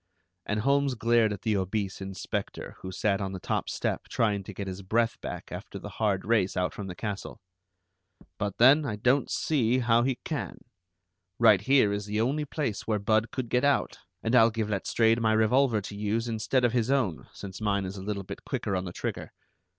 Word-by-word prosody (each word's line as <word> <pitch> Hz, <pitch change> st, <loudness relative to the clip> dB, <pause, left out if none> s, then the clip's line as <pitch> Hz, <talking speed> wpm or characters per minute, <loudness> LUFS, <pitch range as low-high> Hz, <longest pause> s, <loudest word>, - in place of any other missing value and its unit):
And 105 Hz, 0 st, 0 dB
Holmes 140 Hz, +1 st, +2 dB
glared 115 Hz, -1 st, +3 dB
at 100 Hz, -, -6 dB
the 110 Hz, -2 st, +1 dB
obese 95 Hz, 0 st, -2 dB
inspector, 95 Hz, -2 st, -5 dB
who 95 Hz, -, -7 dB
sat 100 Hz, +1 st, 0 dB
on 95 Hz, 0 st, -3 dB
the 95 Hz, -, -5 dB
top -, -, -2 dB
step -, -, -2 dB
trying 105 Hz, -3 st, +1 dB
to -, -, -7 dB
get 100 Hz, -, -4 dB
his 95 Hz, 0 st, -6 dB
breath 115 Hz, +4 st, 0 dB
back -, -, -6 dB
after -, -, -7 dB
the -, -, -8 dB
hard 100 Hz, -3 st, +1 dB
race 105 Hz, -4 st, +1 dB
out 90 Hz, 0 st, 0 dB
from 100 Hz, -, -6 dB
the 90 Hz, -, -6 dB
castle. 105 Hz, 0 st, -5 dB, 1.0 s
"But 100 Hz, -2 st, -2 dB
then, 135 Hz, +6 st, +7 dB
I 115 Hz, -7 st, -2 dB
don't 125 Hz, +6 st, +2 dB
see 125 Hz, -5 st, +1 dB
how 120 Hz, -2 st, +3 dB
he 130 Hz, +1 st, +1 dB
can. -, -, -4 dB, 0.8 s
Right 110 Hz, -5 st, +6 dB
here 130 Hz, -3 st, +4 dB
is 100 Hz, 0 st, -3 dB
the 105 Hz, +1 st, -1 dB
only 140 Hz, +6 st, 0 dB
place 135 Hz, -8 st, -3 dB
where 110 Hz, -2 st, +1 dB
Budd 110 Hz, +2 st, +1 dB
could 130 Hz, -3 st, -4 dB
get 125 Hz, +2 st, +1 dB
out, 140 Hz, -1 st, +1 dB, 0.2 s
and 115 Hz, -, -1 dB
I'll 115 Hz, -2 st, +7 dB
give 110 Hz, -1 st, -2 dB
Letstrayed 115 Hz, +3 st, +2 dB
my 110 Hz, -1 st, +3 dB
revolver 110 Hz, +1 st, +3 dB
to 100 Hz, +1 st, -8 dB
use 105 Hz, +3 st, -1 dB
instead 120 Hz, +3 st, +1 dB
of 120 Hz, -, +1 dB
his 120 Hz, -1 st, +1 dB
own, 125 Hz, -, 0 dB
since 95 Hz, 0 st, -9 dB
mine 100 Hz, -2 st, 0 dB
is 95 Hz, +1 st, -5 dB
a 95 Hz, -, -7 dB
little 100 Hz, 0 st, -3 dB
bit -, -, -8 dB
quicker 100 Hz, -, -2 dB
on 90 Hz, 0 st, -2 dB
the 90 Hz, -, -6 dB
trigger. -, -, -5 dB
110 Hz, 205 wpm, -28 LUFS, 100-120 Hz, 1.0 s, then